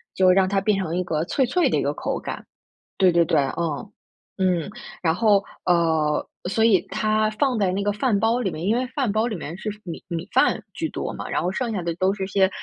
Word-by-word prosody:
就 185 -1 +5
让 190 0 +4
它 195 0 +2
变 200 +1 +1
成 180 -4 -2
一 180 - 0
个 160 -3 -1
脆 265 +8 +1
脆 335 +9 +2
的 - - +1
一 - - +1
个 - - 0
口 - - -3
感。 - - -6 0.5
对 185 -2 +5
对 170 0 +4
对， 155 -2 +2
呃， 155 +6 -3 0.5
嗯， 185 -3 +1 0.3
然 160 -2 +2
后 205 -1 +4 0.2
呃， 160 -4 +2 0.2
所 220 +4 +1
以 220 -5 +5
它 215 0 +1
放 255 +2 0
在 195 -3 +2
那 195 +2 -1
个 205 - +1
饭 210 +1 +1
包 225 +3 +2
里 205 -7 -1
面 155 - -6
因 215 +4 +2
为 255 - 0
饭 265 -7 +1
包 215 +2 +1
里 225 - -3
面 165 -1 -6
是 215 - -4
米 170 -3 -7
米 170 0 -4
饭 - - +3
居 - - -2
多 - - -4
嘛， - - -6
然 - - 0
后 180 - -1
剩 240 +3 -2
下 195 - -2
的 170 -1 -2
都 185 +3 +1
是 195 -2 -3
些 190 -1 +3
190 Hz, 255 characters per minute, -23 LUFS, 170-215 Hz, 0.5 s, 就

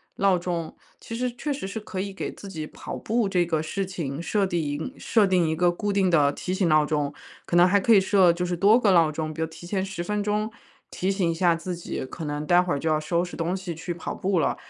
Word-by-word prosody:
闹 195 -2 +3
钟。 170 -2 -3 0.3
其 - - -9
实 250 +2 -1
确 270 +5 -4
实 270 -8 -3
是 200 - -6
可 200 -3 -6
以 195 +1 -3
给 190 - -4
自 200 - -11
己 160 -5 -5
跑 - - -8
步 225 -1 0
这 180 -2 +2
个 160 -2 0
事 195 +5 -3
情 160 -6 -4
设 200 +3 +1
定 175 -2 -1
一 145 - -4
设 215 -4 +2
定 180 -4 +2
一 160 - 0
个 175 +2 +3
固 205 +4 -2
定 195 -2 +2
的 150 -5 +4
提 180 - -4
醒 185 -2 +1
闹 155 -1 +4
钟。 150 -2 -1 0.3
可 - - -2
能 175 +1 +7
还 200 +2 +4
可 230 - +4
以 205 - +8
设 190 -2 +4
就 175 +1 -2
是 175 0 -1
多 205 +7 +5
个 210 -5 +3
闹 165 -4 +5
钟， 155 0 -4
比 160 - -5
如 160 - 0
提 160 +2 -12
前 190 0 -1
10 190 -2 -5
分 210 +4 -1
钟， 210 +1 0 0.4
提 190 +2 -1
醒 190 -3 0
一 - - +1
下 170 +1 +3
自 170 +2 -4
己， 170 -5 -5
可 160 +5 -8
能 150 0 -3
待 175 +2 +6
会 180 -1 -1
儿 140 - -1
就 160 - -1
要 155 - +3
收 170 +3 0
拾 175 - -9
东 170 +2 -1
西 185 -3 -6
去 175 +2 -4
跑 170 - -6
步 190 -2 0
了。 - - +1
180 Hz, 290 characters per minute, -25 LUFS, 165-195 Hz, 0.4 s, 以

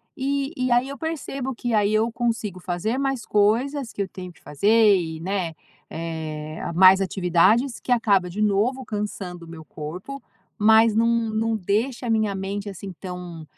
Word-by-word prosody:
Eh, 275 +1 -1
e 255 -1 -1
aí, 245 +2 +3
eu 280 - -6
percebo 275 -4 -4
que 240 -1 -3
aí 210 -1 +3
eu 220 +2 +2
consigo 225 -5 -2
fazer 185 +8 -2
mais 270 -3 -1
coisas, 235 +6 +1
que - - -15
eu - - -6
tenho 180 -1 -9
que - - -22
fazer, 210 +7 +4
e, 160 -3 -3
né, 180 -2 -2 0.3
eh, 160 -1 -5
ah, - - -4
mais 190 +2 +7
atividades 195 +7 +2
que 250 - -6
acaba, 200 -6 +3
de 195 - -7
novo 215 +6 +1
cansando 190 -5 -5
o - - -14
meu 160 -1 -10
corpo, 180 - -7 0.4
mas 220 +1 +5
não 230 +1 +3 0.2
não 225 +1 0
deixa 225 +7 -1
a 235 - -2
minha 215 -3 +1
mente, 200 +2 -4
assim, 195 0 -8
tão 180 -2 -8
210 Hz, 175 wpm, -23 LUFS, 180-240 Hz, 0.4 s, mais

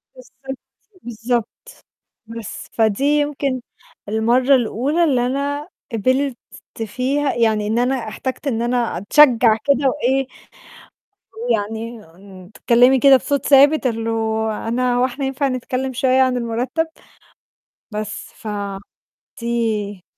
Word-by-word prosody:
بالضبط، 260 +1 -10 0.5
بالضبط. 235 0 -2 0.8
بس، 230 -2 -8
فدي 220 +2 +1
يمكن 290 -3 0 0.5
المرّة 240 +5 +3
الأولى 265 +7 0
اللي 255 -6 +2
أنا 285 +4 -2 0.3
قبلت 255 +3 0 0.5
فيها 270 +6 -1
يعني 220 -3 +1
إن 225 +2 0
أنا 255 +2 +1
احتجت 260 +5 -5
إن 230 -4 -1
أنا 240 0 0
أتشجّع 230 +1 +5
كده 280 -1 +3
وإيه، 265 -1 0 1.2
ويعني 225 - -2 0.5
تتكلِّمي 245 +4 +4
كده 275 0 +7
بصوت 280 +1 -2
ثابت 280 0 +5
اللي 225 -1 -2 0.6
أنا 245 +1 0
هو 250 +1 +3
إحنا 270 +2 -4
ينفع 270 +1 -1
نتكلِّم 255 +1 -3
شوية 260 0 +2
عن 255 -1 +2
المرتَّب؟ 245 +7 -2 1.0
بس، 210 0 -6 0.8
فدي 220 -5 -3
250 Hz, 105 wpm, -20 LUFS, 230-270 Hz, 1.2 s, كده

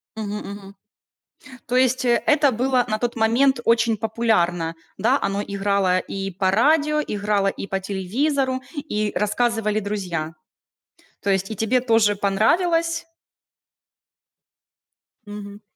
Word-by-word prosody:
Мгм 210 -2 -4
мгм. 200 -1 -9 0.9
То 245 - -1
есть 255 0 +2
это 280 +4 +3
было 250 +2 +1
на 215 - -1
тот 240 +2 -2
момент 240 +4 +3
очень 230 -1 +3
популярно, 195 -7 0 0.2
да? 240 +8 +2
Оно 200 +1 -1
играло 200 -2 +1
и 195 +1 -5
по 190 +1 0
радио, 300 +6 +3
играло 205 -1 0
и 195 0 -3
по 195 +1 -2
телевизору, 260 +8 -1
и 215 -9 -2
рассказывали 215 0 0
друзья. 180 -6 -4 0.9
То 200 - +1
есть 195 0 0
и - - -4
тебе 225 +5 +1
тоже 225 -4 +3
понравилось? 330 - +1 2.2
Мгм. 205 0 -9
215 Hz, 120 wpm, -22 LUFS, 200-250 Hz, 2.2 s, это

